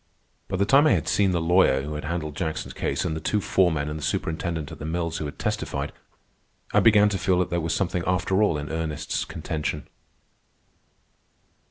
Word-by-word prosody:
By 95 Hz, -, -2 dB
the 100 Hz, -, +2 dB
time 140 Hz, +8 st, +5 dB
I -, -, +5 dB
had -, -, 0 dB
seen 100 Hz, -2 st, +3 dB
the 90 Hz, -2 st, +1 dB
lawyer 80 Hz, -5 st, +3 dB
who 75 Hz, +2 st, -5 dB
had 75 Hz, 0 st, -5 dB
handled 75 Hz, -2 st, -3 dB
Jackson's 80 Hz, 0 st, -3 dB
case, -, -, -2 dB
and 80 Hz, -, -1 dB
the -, -, -3 dB
two 105 Hz, -, 0 dB
foremen 85 Hz, -7 st, +1 dB
and 75 Hz, +1 st, -4 dB
the -, -, -7 dB
superintendent 80 Hz, 0 st, -2 dB
at -, -, -9 dB
the -, -, -7 dB
mills 85 Hz, 0 st, -2 dB
who 80 Hz, -, -3 dB
had 70 Hz, -, -7 dB
testified, -, -, -2 dB, 0.8 s
I -, -, +6 dB
began 105 Hz, -2 st, +6 dB
to 95 Hz, -2 st, -2 dB
feel 95 Hz, 0 st, +2 dB
that 90 Hz, -, 0 dB
there 85 Hz, 0 st, 0 dB
was 80 Hz, 0 st, -1 dB
something 90 Hz, -2 st, -1 dB
after 90 Hz, +2 st, +1 dB
all 100 Hz, -7 st, +3 dB
in 75 Hz, +1 st, -5 dB
Ernest's 80 Hz, -2 st, -2 dB
contention. 75 Hz, -1 st, -4 dB
85 Hz, 200 wpm, -25 LUFS, 75-95 Hz, 0.8 s, I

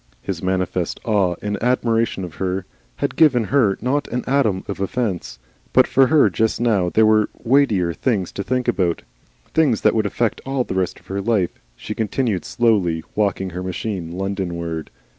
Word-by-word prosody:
His -, -, -5 dB
manifest 95 Hz, -1 st, -1 dB
awe 100 Hz, -6 st, +2 dB
and 105 Hz, -1 st, -3 dB
admiration 115 Hz, -4 st, +1 dB
of 90 Hz, -3 st, -7 dB
her 95 Hz, 0 st, -2 dB, 0.3 s
had -, -, -2 dB
given 135 Hz, -7 st, +4 dB
her 115 Hz, -9 st, +3 dB
not 140 Hz, +5 st, 0 dB
an 125 Hz, 0 st, -3 dB
atom 120 Hz, -8 st, +1 dB
of 100 Hz, -, -5 dB
offence. 100 Hz, -2 st, -2 dB, 0.4 s
But -, -, +6 dB
for 135 Hz, -1 st, +4 dB
her 155 Hz, 0 st, +5 dB
just 110 Hz, -1 st, 0 dB
now 105 Hz, -7 st, +2 dB
there 110 Hz, +4 st, +4 dB
were 110 Hz, -1 st, +4 dB
weightier 115 Hz, -9 st, +2 dB
things 100 Hz, -3 st, -1 dB
to 100 Hz, -, -4 dB
think 125 Hz, +3 st, -1 dB
about, 85 Hz, -4 st, 0 dB, 0.5 s
things 145 Hz, -9 st, +3 dB
that -, -, +4 dB
would 110 Hz, -2 st, +1 dB
affect 115 Hz, +3 st, -1 dB
all 135 Hz, -1 st, -1 dB
the -, -, -5 dB
rest 95 Hz, -1 st, -1 dB
of -, -, -27 dB
her 100 Hz, +1 st, -3 dB
life. 100 Hz, -4 st, +1 dB, 0.2 s
She 105 Hz, -, -6 dB
continued 110 Hz, -3 st, -1 dB
slowly 95 Hz, -9 st, +1 dB
walking 95 Hz, -3 st, 0 dB
her 90 Hz, +2 st, -5 dB
machine 90 Hz, -2 st, -4 dB
Londonward. 85 Hz, -4 st, -3 dB
105 Hz, 175 wpm, -21 LUFS, 95-120 Hz, 0.5 s, But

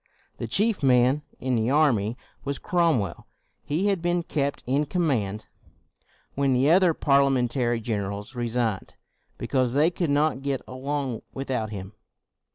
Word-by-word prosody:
The -, -, -3 dB
chief 215 Hz, 0 st, +1 dB
man 130 Hz, +1 st, +4 dB, 0.2 s
in 130 Hz, -1 st, 0 dB
the 115 Hz, +1 st, +1 dB
army 125 Hz, -7 st, +2 dB, 0.3 s
was 140 Hz, 0 st, -2 dB
Cromwell. 160 Hz, -, 0 dB, 0.4 s
He 160 Hz, +7 st, -1 dB
had 195 Hz, -4 st, +1 dB
been 175 Hz, 0 st, 0 dB
kept 140 Hz, -4 st, -2 dB
in 140 Hz, +4 st, +1 dB
command 125 Hz, -, -1 dB, 0.9 s
when 140 Hz, -1 st, +1 dB
the 130 Hz, +4 st, +3 dB
other 180 Hz, -2 st, +5 dB
Parliamentary 130 Hz, -4 st, +2 dB
generals 105 Hz, -1 st, -4 dB
resigned, 120 Hz, -4 st, -2 dB, 0.4 s
because 130 Hz, -3 st, 0 dB
they 150 Hz, +5 st, +4 dB
could 170 Hz, -2 st, -2 dB
not 145 Hz, -1 st, +1 dB
get 140 Hz, -1 st, -2 dB
along 135 Hz, -1 st, -3 dB
without 130 Hz, -5 st, -2 dB
him. 100 Hz, -1 st, -7 dB
135 Hz, 135 wpm, -25 LUFS, 120-150 Hz, 0.9 s, other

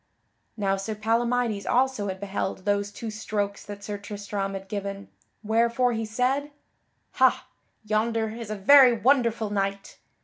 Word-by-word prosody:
Now 195 Hz, -2 st, +1 dB
Sir 215 Hz, +3 st, -4 dB
Palamydes 230 Hz, 0 st, 0 dB
also 255 Hz, -5 st, +1 dB
had 190 Hz, -1 st, -4 dB
beheld 195 Hz, -1 st, -4 dB
those 205 Hz, 0 st, 0 dB
two 225 Hz, +1 st, -6 dB
strokes 205 Hz, -2 st, -3 dB
that 205 Hz, -1 st, -9 dB
Sir 205 Hz, 0 st, -5 dB
Tristram 205 Hz, -1 st, -4 dB
had 195 Hz, 0 st, -7 dB
given, 200 Hz, 0 st, -5 dB, 0.3 s
wherefore 235 Hz, +3 st, +2 dB
he 225 Hz, 0 st, -2 dB
said: 255 Hz, +6 st, 0 dB, 0.6 s
"Hah! -, -, +3 dB, 0.4 s
Yonder 220 Hz, +1 st, 0 dB
is 225 Hz, 0 st, -7 dB
a 215 Hz, -, -2 dB
very 255 Hz, +5 st, +7 dB
wonderful 230 Hz, -3 st, +2 dB
knight. 195 Hz, -1 st, -3 dB
215 Hz, 140 wpm, -26 LUFS, 200-235 Hz, 0.6 s, very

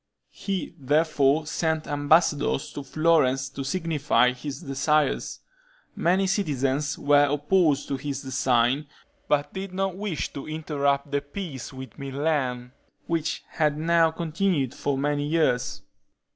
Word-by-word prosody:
He 195 Hz, -2 st, -4 dB
therefore 150 Hz, +1 st, +2 dB
sent 160 Hz, 0 st, -1 dB
ambassadors 145 Hz, -1 st, +2 dB
to 145 Hz, -, -5 dB
Florence 135 Hz, -3 st, +2 dB
to 135 Hz, 0 st, -6 dB
signify 150 Hz, -5 st, +2 dB
his 140 Hz, +5 st, -7 dB
desires. 140 Hz, +1 st, 0 dB, 0.5 s
Many 185 Hz, +3 st, +2 dB
citizens 145 Hz, -7 st, 0 dB
were 145 Hz, 0 st, +4 dB
opposed 150 Hz, 0 st, +2 dB
to 140 Hz, -, -1 dB
his 140 Hz, 0 st, -4 dB
design, 130 Hz, +1 st, +1 dB, 0.4 s
but 145 Hz, 0 st, +1 dB
did 190 Hz, -1 st, -6 dB
not 195 Hz, -1 st, -1 dB
wish 195 Hz, -5 st, -3 dB
to 140 Hz, -, -7 dB
interrupt 145 Hz, -3 st, -1 dB
the 140 Hz, 0 st, +1 dB
peace 145 Hz, -, -7 dB
with 130 Hz, +2 st, -10 dB
Milan, 135 Hz, -3 st, -2 dB, 0.3 s
which 165 Hz, -1 st, -2 dB
had 150 Hz, -2 st, 0 dB
now 165 Hz, +1 st, +3 dB
continued 160 Hz, -4 st, -1 dB
for 140 Hz, -1 st, -2 dB
many 145 Hz, +1 st, 0 dB
years. 150 Hz, -6 st, 0 dB
145 Hz, 125 wpm, -25 LUFS, 135-160 Hz, 0.5 s, were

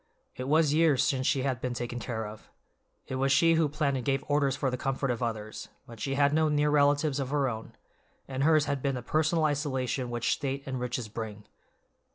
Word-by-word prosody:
It 130 Hz, -, -5 dB
was 155 Hz, 0 st, +3 dB
years 155 Hz, -4 st, +4 dB
since 135 Hz, -2 st, 0 dB
she 135 Hz, -3 st, +1 dB
had 130 Hz, -2 st, -1 dB
been 125 Hz, -1 st, -2 dB
taken 120 Hz, 0 st, -4 dB
care 110 Hz, -1 st, -4 dB
of. 105 Hz, 0 st, -10 dB, 0.6 s
It 130 Hz, -, -4 dB
was 135 Hz, +1 st, +1 dB
she 165 Hz, +4 st, +5 dB
who 160 Hz, -2 st, +2 dB
planned 145 Hz, -2 st, 0 dB
and 125 Hz, -, -4 dB
gave 135 Hz, +2 st, 0 dB
orders 145 Hz, -2 st, +2 dB
for 135 Hz, -2 st, -1 dB
the -, -, -1 dB
comfort 135 Hz, +1 st, -1 dB
of 120 Hz, -, -3 dB
others, 110 Hz, -2 st, -4 dB, 0.2 s
but 115 Hz, -2 st, -12 dB
she 135 Hz, +4 st, -2 dB
had 140 Hz, 0 st, +3 dB
no 155 Hz, 0 st, +3 dB
near 150 Hz, 0 st, +2 dB
relatives 145 Hz, 0 st, +3 dB
of 135 Hz, -2 st, -2 dB
her 140 Hz, -1 st, +1 dB
own, 110 Hz, -2 st, -5 dB, 0.5 s
and 135 Hz, 0 st, -2 dB
hers 155 Hz, -1 st, +4 dB
had 140 Hz, -1 st, -2 dB
been 135 Hz, 0 st, 0 dB
the 125 Hz, -, -5 dB
personal 155 Hz, +3 st, +1 dB
isolation 130 Hz, -4 st, -1 dB
which 120 Hz, -1 st, 0 dB
state 140 Hz, 0 st, -3 dB
and 130 Hz, -1 st, -3 dB
riches 125 Hz, -1 st, -3 dB
bring. 105 Hz, -1 st, -6 dB
135 Hz, 215 wpm, -29 LUFS, 125-145 Hz, 0.6 s, she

